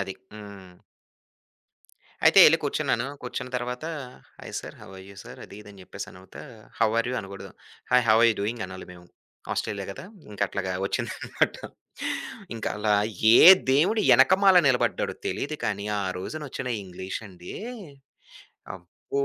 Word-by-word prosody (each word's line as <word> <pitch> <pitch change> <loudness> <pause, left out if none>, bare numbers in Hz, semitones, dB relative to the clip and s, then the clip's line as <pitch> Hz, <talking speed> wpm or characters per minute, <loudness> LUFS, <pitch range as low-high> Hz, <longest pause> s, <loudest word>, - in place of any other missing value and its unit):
అది. 95 -1 -4 0.2
హ్మ్. 100 -4 -13 1.4
అయితే, - - +6
ఎళ్లి 165 +2 +5
కూర్చున్నాను. 135 -3 -1 0.2
కూర్చున్న 125 0 -6
తరువాత, 125 +3 -5 0.6
hi - - -10
sir, - - -11
how - - -13
are 95 - -11
you 100 - -15
sir - - -11
అది, 100 - -13
ఇది 105 - -14
అని 95 - -15
చెప్పేసనువుతా 95 +1 -10 0.4
హౌ 110 - +3
ఆర్ 115 - 0
యు - - -3
అనకూడదు. 95 -1 -10 0.4
Hi, 125 -1 +4
how 110 - +6
are 120 - +6
you - - -1
doing 110 +1 -3
అనాలి 95 0 -10
మేము, 90 0 -15 0.5
ఆస్ట్రేలియా 100 -1 -3
కదా. - - -10 0.3
ఇంక 105 - -11
అట్లాగా 95 -2 -3
వచ్చిందన్నమాట. - - -2 1.0
ఇంక 115 - -6
అలా 105 0 +1 0.4
ఏ - - +7 0.3
దేవుడు 185 +11 +3 0.2
ఎనకమాల 190 +7 +5
నిలబడ్డాడో 125 -2 0
తెలీదు 155 +2 -3
కానీ, 100 -1 -2
ఆ - - -2 0.2
రోజునొచ్చిన 135 +3 -6 0.2
ఇంగ్లీష్ 95 +1 -7
అండి, 90 -1 -11 1.2
అబ్బో! 95 +10 -5
105 Hz, 145 wpm, -25 LUFS, 95-130 Hz, 1.4 s, ఏ